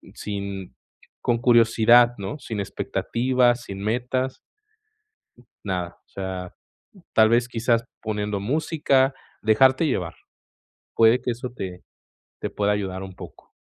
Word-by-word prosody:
sin 100 -2 -6 0.5
con 120 - +1
curiosidad, 120 0 +5
¿no?, 100 +8 -5
sin 110 -5 -5
expectativas, 120 +4 0
sin 100 0 -7
metas. 125 +4 -1 1.2
Nada, 90 -3 -3
o - - -59
sea, 95 -2 -6 0.6
tal 110 -1 +6
vez 120 +1 +3
quizás 115 -1 +1 0.2
poniendo 105 -2 -2
música, 135 +2 +1 0.3
dejarte 130 +8 +4
llevar. - - -2 0.8
Puede 115 +2 +5
que 125 - -2
eso 120 +1 -5
te 95 -7 -7 0.6
te - - -3
pueda 105 0 0
ayudar 95 -2 -2
un 95 -1 -8
poco. - - -12
115 Hz, 120 wpm, -24 LUFS, 100-125 Hz, 1.2 s, tal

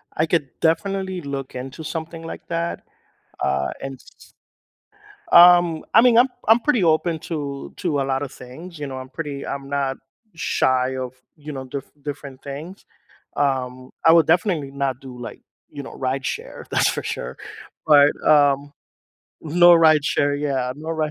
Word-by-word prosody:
I 155 - +2
could 155 -5 0
definitely 190 +2 0
look 140 -2 -6
into 135 +5 -7
something 165 +1 -6
like 165 - -8
that, 170 0 -3 0.6
uh, 70 -1 0
and 135 0 -5
s - - -17 0.2
s - - -18 1.0
um, 175 -2 +7
I 225 - +8
mean, 240 -2 +5
I'm 250 +2 +6 0.2
I'm 225 +2 +6
pretty 250 -10 +2
open 160 0 +2
to 140 -4 -5
to 160 -7 -1
a - - +1
lotta 135 0 -2
things, 155 +8 -11
you 145 - -4
know, 130 -1 -6
I'm 130 0 -8
pretty 145 -2 -6
I'm 140 0 -6
not 140 -1 -1 0.4
shy 130 -4 +1
of, 130 -1 -5 0.2
you 150 0 -9
know, 135 -1 -6
diff 135 +1 -7
different 140 -2 -7
things, 150 +7 -8 0.5
um, 130 -2 -1 0.2
I 165 - +8
would 165 -3 +5
definitely 165 -5 +1
not 135 -2 -2
do, 125 -2 -10
like, 120 - -8 0.3
you 145 -1 -8
know, - - -10
rideshare, 130 0 -4
that's - - +2
for - - -3
sure. - - -5 0.5
But, 145 -1 +7
um 145 -1 +4 0.7
no 175 +3 +5
rideshare, 145 -3 +3
yeah, 130 -4 -1
no 160 +2 -6
ri 155 -2 -1
145 Hz, 160 wpm, -22 LUFS, 135-165 Hz, 1.0 s, I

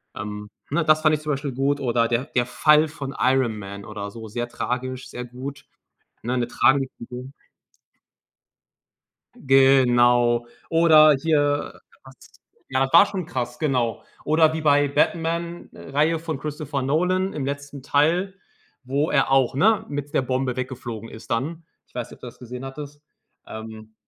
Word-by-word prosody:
ähm, 105 0 -6 0.2
ne? 160 +2 0
Das 155 0 +4
fand 155 -1 +4
ich 150 - -6
zum 155 0 -3
Beispiel 140 -1 -3
gut 140 +2 0
oder 120 -3 +1
der 120 +3 0
der 125 -4 0
Fall 150 +4 +4
von 140 -3 -7
Iron 125 -4 +2
Man 100 0 -8
oder 100 -1 -6
so, 110 0 -9
sehr 120 +3 -4
tragisch, 130 +1 -4
sehr 125 - -6
gut, 130 +3 -8 0.6
ne? 125 +2 -1
'Ne 120 -1 0
tragende 135 +2 +2
Figur. 125 +3 -9 2.0
Genau. 120 -3 +4 0.2
Oder 155 -2 +6
hier, 145 0 +1
äh, - - -18 0.3
was 130 - -14 0.5
ja, 135 0 +1
war 170 +5 +8
schon 190 -5 -5
krass, 120 -5 -4
genau. 125 -7 0 0.2
Oder 155 +1 +4
wie 160 - -3
bei 145 -1 +3
Batman, 170 +3 -1
äh, - - -12
Reihe 155 +4 +2
von 160 -4 -5
Christopher 150 -2 -4
Nolan 180 +7 +1
im 145 -3 -4
letzten 140 -1 -5
Teil, 165 +7 +1 0.5
wo 140 +4 0
er 135 -1 +2
auch, 135 -1 +3
ne, 210 +9 +3
mit 145 -1 -4
s 145 - -22
'ner - - +2
Bombe 130 0 -1
weggeflogen 120 -3 -6
ist 110 0 -12
dann. 155 +8 -2 0.2
Ich - - -34
weiß 125 -1 -5
nicht, - - -12
ob - - -30
du - - -9
das 120 - -15
gesehen 125 +1 -8
hattest. 145 +2 -9 0.4
Ähm 110 0 -9
135 Hz, 165 wpm, -23 LUFS, 120-150 Hz, 2.0 s, war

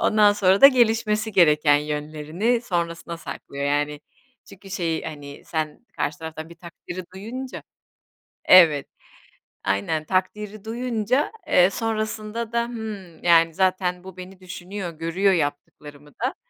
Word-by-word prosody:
Ondan 210 -1 +5
sonra 195 -1 +3
da 275 - +12
gelişmesi 220 -4 +1
gereken 150 -4 +5
yönlerini 155 +9 -2
sonrasına 170 -3 -3
saklıyor 140 -3 -7
yani. 145 +1 0 0.4
Çünkü 200 -1 -14
şey, 170 -4 -2
hani, 145 -2 -8
sen 155 +8 -4
karşı 145 - -2
taraftan 160 0 -7
bir 170 - -11
takdiri 175 +1 -9
duyunca, 250 +7 -7 0.8
evet, 160 -6 +6 0.8
aynen 100 +12 -1
takdiri 205 +4 -2
duyunca, 240 +3 -1 0.2
eee, 180 +1 +5
sonrasında 220 +1 -3
da, 235 0 +2
hımm 215 -7 -8
yani 165 -1 +5
zaten 185 0 0
bu 190 -1 -11
beni 185 +1 -10
düşünüyor 185 0 -7
görüyor 165 +5 +1
yaptıklarımı 145 -1 -4
da, 255 - 0
185 Hz, 125 wpm, -23 LUFS, 160-215 Hz, 0.8 s, da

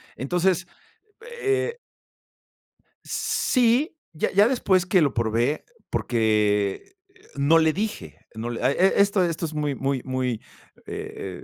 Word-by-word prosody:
Entonces, 180 - 0 0.7
eh 405 +4 0 1.3
Sí, 255 +6 +1 0.2
ya 155 - -1
ya 205 +3 +5
después 190 -8 +2
que 185 -1 +3
lo 145 - +2
probé, 115 +5 0 0.2
porque 110 - 0 0.4
no 145 +4 +4
le 160 -1 +3
dije, 215 +3 -4 0.2
no 115 +2 -4
le 120 - -4
e 140 +8 +3
e - - +6
esto 200 -2 +3
esto 165 -1 -1
es 155 - -5
muy 150 -2 -1
muy 135 -2 -1
muy, 130 -3 -2 0.5
eh, 95 -2 -7
155 Hz, 125 wpm, -24 LUFS, 120-190 Hz, 1.3 s, e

